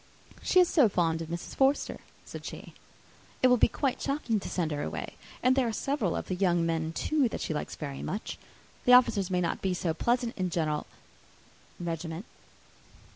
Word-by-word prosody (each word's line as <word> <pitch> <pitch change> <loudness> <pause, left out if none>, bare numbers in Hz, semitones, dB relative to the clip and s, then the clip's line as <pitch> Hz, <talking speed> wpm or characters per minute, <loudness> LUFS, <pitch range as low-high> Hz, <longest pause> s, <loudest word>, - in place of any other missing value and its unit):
"She 370 - +4
is 360 - +6
so 285 -11 +4
fond 165 -3 +1
of 165 - -5
Mrs. 170 +1 -6
Forster," 270 +1 +2 0.3
said - - -8
she, - - -8 0.7
"it 255 - +7
will 250 - +5
be - - +5
quite 270 -4 -1
shocking 275 -6 0
to - - -6
send 165 -4 -1
her 145 -1 -2
away! - - -4 0.3
And 255 +1 +5
there 265 -3 +2
are - - 0
several 235 - -1
of - - -4
the - - -2
young 175 -2 +2
men, 160 -1 -1
too, 280 - +1
that - - -5
she - - -2
likes 150 - -4
very 140 -3 -6
much. 205 +4 -4 0.5
The 250 - +6
officers 230 -6 +5
may 180 -1 +1
not 170 - -1
be 190 -2 0
so 170 -2 -1
pleasant 240 +7 0
in 185 -2 0
General 155 -3 -1 0.9
's 175 - -5
regiment." 165 +3 -4
185 Hz, 195 wpm, -29 LUFS, 165-250 Hz, 0.9 s, it